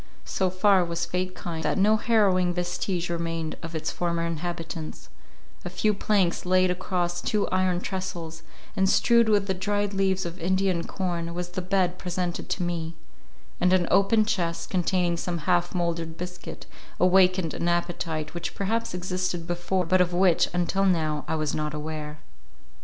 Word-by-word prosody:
So 190 -1 0
far 185 +1 +4
was 170 -1 -2
fate 185 0 -2
kind, 170 -2 -5
that - - 0
no 210 +3 +5
harrowing 195 -6 +2
vestige 180 0 -2
remained 165 -2 -3
of 165 0 -7
its 160 - -2
former 170 -1 -1
inhabitants; 165 -1 -5 0.5
a - - -4
few 215 -1 +1
planks 195 -3 +1
laid 185 0 +3
across 175 -1 -2
two 210 -1 0
iron 185 -1 +1
tressels, 175 -4 -5 0.3
and 190 -1 +2
strewed 235 +1 +4
with 205 -2 +3
the 190 - 0
dried 205 +2 -1
leaves 190 -1 +1
of 170 +2 -6
Indian 185 0 +1
corn, 170 -3 -3
was 175 0 -3
the 180 +1 -4
bed 180 -1 0
presented 180 -1 -3
to 185 - -1
me; 165 -1 -3 0.6
and 180 +1 +3
an 180 -2 +3
open 205 +3 +4
chest, 170 -5 -2
containing 180 -1 +1
some 175 0 -2
half 175 +2 +1
mouldered 170 -2 -2
biscuit, 180 0 -7 0.3
awakened 185 -2 +4
an 170 - -2
appetite, 170 -2 -1
which 175 - -5
perhaps 225 +1 -1
existed 180 -1 -2
before, 175 +2 -1
but 185 +2 +3
of 175 -1 +1
which, 180 -1 +4
until 175 +2 0
now, 155 -5 +1
I - - 0
was 155 -2 -1
not 150 0 -2
aware. 150 0 -5
180 Hz, 165 wpm, -26 LUFS, 170-190 Hz, 0.6 s, no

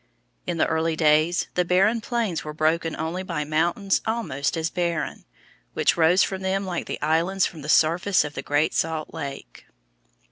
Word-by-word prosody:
In 175 -1 -2
the - - +3
early 160 0 0
days 155 +2 +2
the 180 - +2
barren 195 +6 +2
plains 220 - -2
were 150 0 -7
broken 160 +1 0
only 165 +4 -3
by 165 -5 -3
mountains 170 +6 0
almost 195 - -1
as 160 0 -1
barren, 170 -2 -2 0.5
which - - +2
rose 170 +3 +4
from 190 -1 -3
them 190 +1 -1
like 180 -2 -4
the - - -4
islands 170 +5 +1
from 160 - -6
the 150 - -7
surface 175 +5 +3
of 150 -1 -6
the 135 - -5
Great 145 +3 +1
Salt 160 -1 -2
Lake. 135 - -8
165 Hz, 175 wpm, -24 LUFS, 155-185 Hz, 0.5 s, rose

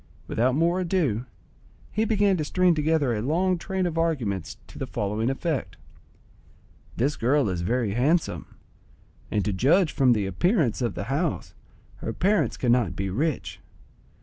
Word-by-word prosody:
Without 125 +3 +1
more 170 +4 +2
ado, 160 - 0 0.6
he 215 +1 0
began 205 -3 +2
to 160 - -1
string 180 +3 +3
together 155 -4 +1
a 105 - -2
long 175 +8 +1
train 190 +1 -2
of 165 -2 -1
arguments 115 - -1
to - - -13
the - - -3
following 105 +4 -1
effect:—"This 135 - -6
girl 135 +2 +2
is 90 -2 -2
very 115 +3 0
handsome, 145 - 0 0.8
and 105 -2 0
to 105 - 0
judge 155 - +3
from 130 -3 +4
the 105 -3 0
appearance 130 - +1
of 120 -5 -1
the - - -3
house, 145 - -2 0.4
her 115 - -4
parents 205 - +1
cannot 120 -8 +1
be 95 +1 -3
rich. 150 - -2
140 Hz, 150 wpm, -25 LUFS, 110-170 Hz, 0.8 s, from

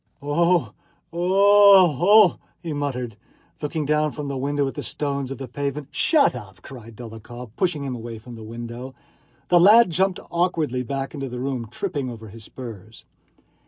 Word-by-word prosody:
"Oh! 170 +5 +1 0.4
Oh! 195 -2 +5 0.3
Oh!" - - -22 0.2
he 165 -3 -4
muttered, 125 -6 -4 0.4
looking 150 +1 -3
down 150 +1 +1
from 145 -1 -6
the 140 - -3
window 140 +1 -1
at 135 - -4
the - - -5
stones 140 -2 -3
of 135 - -6
the 135 - -7
pavement. 140 +2 -4
"Shut 290 - +3
up!" 95 -8 -11
cried 115 -4 -11
Dólokhov, 120 +1 -10
pushing 175 -6 -1
him 135 -2 -4
away 115 -1 -7
from 120 +3 -12
the 115 - -10
window. 120 +3 -8 0.5
The 175 - +5
lad 210 +3 +7
jumped 190 +2 +1
awkwardly 165 -7 0
back 135 +2 -4
into 135 -3 -5
the 125 0 -6
room, 130 -3 -3
tripping 145 - -4
over 110 -2 -9
his 110 +2 -12
spurs. 110 -4 -11
140 Hz, 165 wpm, -23 LUFS, 120-165 Hz, 0.5 s, lad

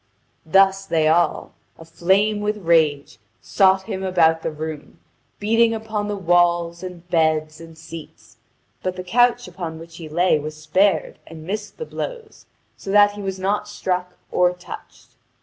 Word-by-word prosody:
Thus 195 +2 +4
they 160 -3 +2
all, 170 +2 +1 0.2
aflame 190 +6 +1
with 210 +1 -1
rage, 150 -9 +2 0.2
sought 190 -1 +3
him 190 -2 -5
about 165 -4 +3
the - - -2
room, 155 -1 -7 0.4
beating 225 +2 +2
upon 215 -2 -3
the 205 - -2
walls, 175 -1 +2
and 180 -2 -9
beds, 155 -2 +1
and 165 -1 -13
seats. 160 -10 -12 0.4
But 185 0 -3
the 185 - -6
couch 245 +5 +2
upon 165 -4 -6
which 165 +1 -12
he 160 -3 -9
lay 175 0 +2
was 155 +1 -7
spared 175 +3 +1
and 160 -1 -10
missed 210 +3 -5
the 470 - -5
blows, 460 -2 -7 0.3
so - - -10
that 205 +1 +6
he 205 0 -9
was 190 -1 -4
not 200 +2 -1
struck 180 -3 -3
or 180 0 +3
touched. 135 -7 -12
180 Hz, 155 wpm, -21 LUFS, 160-205 Hz, 0.4 s, that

